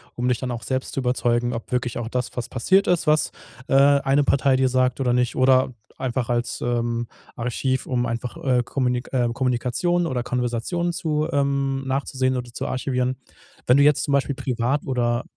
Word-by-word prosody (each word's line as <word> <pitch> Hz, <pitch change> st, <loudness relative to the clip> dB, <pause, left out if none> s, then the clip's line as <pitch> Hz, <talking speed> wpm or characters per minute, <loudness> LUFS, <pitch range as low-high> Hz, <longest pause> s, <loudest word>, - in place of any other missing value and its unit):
um 125 Hz, +1 st, -1 dB
dich 125 Hz, -2 st, +1 dB
dann 130 Hz, -1 st, -3 dB
auch 120 Hz, -1 st, -5 dB
selbst 130 Hz, 0 st, -2 dB
zu -, -, -2 dB
überzeugen, 120 Hz, -1 st, 0 dB
ob 115 Hz, -, -6 dB
wirklich 125 Hz, -2 st, -1 dB
auch 115 Hz, -1 st, -4 dB
das, 125 Hz, 0 st, -2 dB
was 125 Hz, 0 st, -4 dB
passiert 190 Hz, +10 st, +2 dB
ist, 175 Hz, -3 st, +1 dB
was, 155 Hz, 0 st, +3 dB, 0.4 s
äh, -, -, 0 dB
eine 140 Hz, 0 st, +4 dB
Partei 135 Hz, -1 st, +3 dB
dir 130 Hz, 0 st, +3 dB
sagt 130 Hz, 0 st, +1 dB
oder 125 Hz, -2 st, +1 dB
nicht. 125 Hz, 0 st, 0 dB
Oder 130 Hz, 0 st, +4 dB, 0.2 s
einfach 130 Hz, -2 st, -2 dB
als, 120 Hz, 0 st, -1 dB
ähm, 120 Hz, -1 st, -1 dB, 0.3 s
Archiv, 125 Hz, +2 st, -1 dB
um 120 Hz, -1 st, 0 dB
einfach, 115 Hz, +1 st, -4 dB
äh, 125 Hz, -2 st, +3 dB
Kommunik 125 Hz, -1 st, -1 dB
ähm, 120 Hz, -2 st, +1 dB
Kommunikationen 130 Hz, +8 st, 0 dB
oder 130 Hz, -7 st, -1 dB
Konversationen 125 Hz, +9 st, -1 dB
zu 155 Hz, -2 st, -1 dB
ähm, 140 Hz, -2 st, 0 dB
nachzusehen 130 Hz, -1 st, 0 dB
oder 125 Hz, -1 st, -5 dB
zu -, -, -4 dB
archivieren. 130 Hz, -1 st, -1 dB, 0.5 s
Wenn 125 Hz, -, +6 dB
du 140 Hz, -, +5 dB
jetzt 145 Hz, -1 st, +4 dB
zum -, -, -2 dB
Beispiel 140 Hz, 0 st, +1 dB
privat 130 Hz, +1 st, -1 dB
oder 120 Hz, -2 st, 0 dB
130 Hz, 185 wpm, -23 LUFS, 120-140 Hz, 0.5 s, Wenn